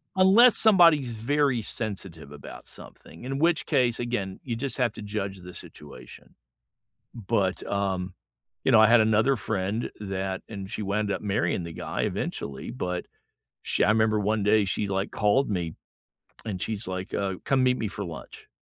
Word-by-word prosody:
unless 200 +6 +6
somebody's 170 - +5
very 125 +2 0
sensitive 95 -10 -1
about 75 - -11
something, 80 - -10
in 135 +2 -3
which 165 -1 +2
case, 125 -6 +1
again, 120 -6 -3
you 120 -3 -3
just 130 +1 -4
have 125 -3 +1
to - - -9
judge 100 -2 -4
the 90 0 -11
situation. 70 -4 -12 0.8
But, 100 -4 -1
um, 95 -2 -2 0.5
you - - +3
know, 110 - +7
I 110 - +8
had 115 0 +6
another 110 +5 +3
friend 105 +2 -2
that 95 -1 -3
and 100 -3 -7
she 110 - -4
wound 100 +1 -1
up - - -3
marrying 95 -4 -1
the 85 - -7
guy - - -4
eventually, 70 -1 -4
but 90 +6 -4 0.6
sh - - -1
I - - +4
remember 110 0 +3
one 105 0 0
day 105 0 +4
she 100 +2 -1
like 95 0 -2
called 105 +7 +2
me 85 -5 -2 0.7
and 95 -5 -4
she's 110 -2 -2
like, 95 0 -5
uh, 95 -1 -1
"Come 135 -2 +2
meet 125 0 +3
me 110 - -2
for 100 0 -5
lunch" 85 -2 -10
105 Hz, 170 wpm, -26 LUFS, 95-120 Hz, 0.8 s, I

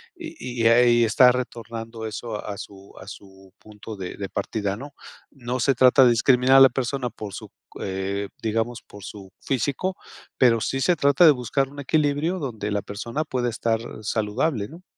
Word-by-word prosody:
y 315 - -6
y - - +5
ahí 120 0 +5
está 125 +3 +5
retornando 115 -2 -6
eso 110 0 -5
a 100 -1 -5
su 100 -2 -11
a 95 - -12
su 95 -2 -13
punto 105 0 -11
de 95 -2 -6
de 100 -1 -6
partida, 100 -3 -3
¿no? 140 +4 -10 0.4
No 125 -1 -5
se 135 +3 +2
trata 130 +2 +6
de 120 - +5
discriminar 125 +2 +4
a - - +9
la 135 - +9
persona 130 0 -2
por 105 -3 -9
su - - -8
c - - -36 0.3
eh, 100 +1 -3
digamos, 115 +1 -2
por 100 -1 -13
su 95 -2 -10
físico, 140 +9 -2 0.4
pero 115 -3 +4
sí 135 - -2
se 175 +6 +2
trata 140 +3 +4
de 155 - +9
buscar 135 +1 -1
un 145 +1 -11
equilibrio, 150 +4 0
donde 110 -8 -4
la 100 -1 -1
persona 115 +9 -4
pueda 125 -1 -1
estar 115 0 -1 0.2
saludable, 110 +3 -1
¿no? 165 +4 -13
120 Hz, 185 wpm, -23 LUFS, 105-135 Hz, 0.4 s, a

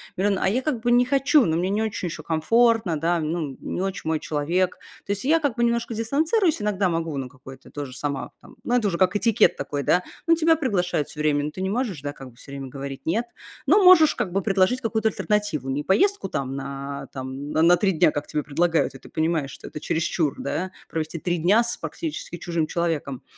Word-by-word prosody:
миллион". 195 +1 +1
А - - +1
я 240 +7 +1
как 260 -6 -2
бы 240 - +1
не 245 +1 +5
хочу, 275 0 +4
но 160 0 +1
мне 180 +2 0
не 210 +2 0
очень 215 -4 -2
еще 170 - -6
комфортно, 220 +2 +2
да, 170 +1 +1
ну, 155 -1 -2
м - - -22
не 180 - -4
очень 195 0 -2
мой 160 -1 +1
человек. 170 +5 -1 0.3
То 200 - -3
есть 200 +4 -3
я 320 +4 +4
как 285 -6 -1
бы 235 - +1
немножко 235 0 0
дистанцируюсь, 310 - +1
иногда 205 -2 +1
могу 165 -3 -2
на 130 - -3
какой-то 130 +1 -13
тоже 140 -3 -6
сама 140 0 -3
там, - - -16
ну, 245 - 0
это 230 -4 +2
уже 170 -3 -1
как 185 +1 +2
этикет 225 +1 +3
такой, 145 -1 -3
да, 180 +6 +3 0.2
ну 330 - +6
тебя 325 0 +4
приглашают 180 - -1
всё 150 - -11
время, 145 -1 +2
ну 150 - -3
ты 185 - -7
не 190 - -1
можешь, 210 - -2
да, 145 0 -4
как 135 -2 -11
бы 120 - -20
всё 140 - -14
время 140 -1 -6
говорить 135 0 -7
"нет", 220 +9 0 0.4
но 380 +8 +5
можешь 360 -4 +7
как 180 - -2
бы 195 - 0
предложить 195 +6 +2
какую-то 220 -1 +1
альтернативу, 205 -13 -1
не 145 +2 -1
поездку 390 - +2
там 135 -3 -3
на, 140 0 -6
там, 135 +2 -6
н 165 +1 +5
на 175 - +7
3 195 0 +2
дня, 165 -3 +3
как 145 - -4
тебе 150 - -2
предлагают, 165 +3 +1
и - - -10
ты - - -15
понимаешь, 160 -3 -1
что - - -10
это - - -7
чересчур, 160 -1 -1
да, 185 +1 -3 0.2
провести 160 +1 -4
3 175 +1 -1
дня 200 +8 +4
с 235 0 -3
практически 310 - -5
чужим 170 -2 -2
человеком, 160 -6 -2
180 Hz, 230 wpm, -24 LUFS, 150-230 Hz, 0.4 s, можешь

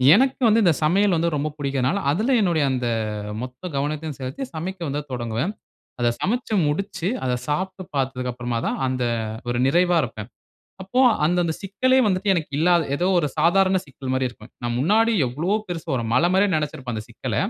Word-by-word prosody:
எனக்கு 265 +4 +2
வந்து 225 +1 +4
இந்த 175 -4 +5
சமையல் 190 +5 +3
வந்து 170 +1 +1
ரொம்ப 150 +1 -1
புடிக்கிறதனால, 140 +5 0
அதில 220 - +1
என்னுடைய 170 -6 +2
அந்த 125 -2 -1 0.5
மொத்த 125 +1 -8
கவனத்தையும் 150 +1 -2
செலுத்தி 135 - -5
சமைக்க 185 +4 -4
வந்து 145 +2 -2
தொடங்குவேன். 120 - -2 0.5
அத 120 - +3
சமைச்சி 230 +2 -1
முடிச்சி, 165 +3 -2 0.2
அத 125 - 0
சாப்ட்டு 185 +5 -2
பார்த்த்துக்கு 130 -2 -1
அப்புறமா 120 -1 -3
தான், - - -1
அந்த 130 -1 -1 0.4
ஒரு 120 - 0
நிறைவா 175 +5 +3
இருப்பேன். 110 -4 -6 0.5
அப்போ 220 +7 0 0.2
அந்த, 175 +3 +2
அந்த 165 - 0
சிக்கலே 255 +7 +2
வந்துட்டு 195 +1 +1
எனக்கு 165 -5 -1
இல்லாத 170 +1 +4
ஏதோ 175 +5 0
ஒரு 150 - +1
சாதாரண 190 +2 +4
சிக்கல் 135 -1 -7
மாரி 130 0 +1
இருக்கும். 120 -1 -14
நான் 120 0 -1
முன்னாடி 220 - +3
எவ்வளோ 165 - 0
பெரிசு 170 -2 -5
வரும். 115 -3 -1
மலை 170 +7 +4
மாரி 195 +2 +4
நினைச்சிருப்பேன் 135 -5 -3
அந்த 110 -1 -5
சிக்கல. - - -4
155 Hz, 175 wpm, -23 LUFS, 130-190 Hz, 0.5 s, இந்த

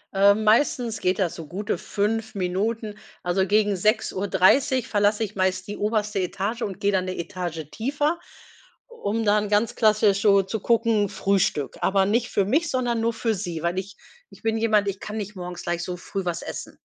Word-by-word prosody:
Ähm, 200 +2 +5
meistens 230 0 +2
geht 185 0 +1
das 175 -3 +1
so 165 -3 -8
gute 195 +6 -3
5 220 +2 -2
Minuten. 205 +4 -2 0.3
Also 190 +2 +1
gegen 210 0 +3
6:30 215 +5 +2
verlasse 205 +1 +2
ich 210 -1 -5
meist 185 -1 0
die 205 - -5
oberste 210 -1 0
Etage 200 +5 -2
und 195 -5 -4
gehe 200 - +2
dann 185 -2 +1
'ne 185 - -4
Etage 170 -3 -4
tiefer, 290 +7 -1 0.7
um 225 - -2
dann 210 0 +2
ganz 210 +2 +1
klassisch 215 -3 +3
so 200 -2 +5
zu 215 +3 -4
gucken: 225 -2 +2
Frühstück. 190 -8 0
Aber 195 0 +3
nicht 230 +4 +1
für 200 - +1
mich, 300 - +1
sondern 245 -3 0
nur 230 +1 +1
für 225 0 0
sie, 175 -5 -4
weil 175 +2 0
ich 195 +2 -8 0.3
ich - - -17
bin 225 0 +1
jemand, 215 -2 +2
ich 195 0 -3
kann 215 +1 -6
nicht 210 0 -5
morgens 180 -1 -7
gleich 175 0 -2
so 180 0 -4
früh 195 +2 -5
was 175 -1 -2
essen. - - -7
205 Hz, 190 wpm, -24 LUFS, 185-225 Hz, 0.7 s, Ähm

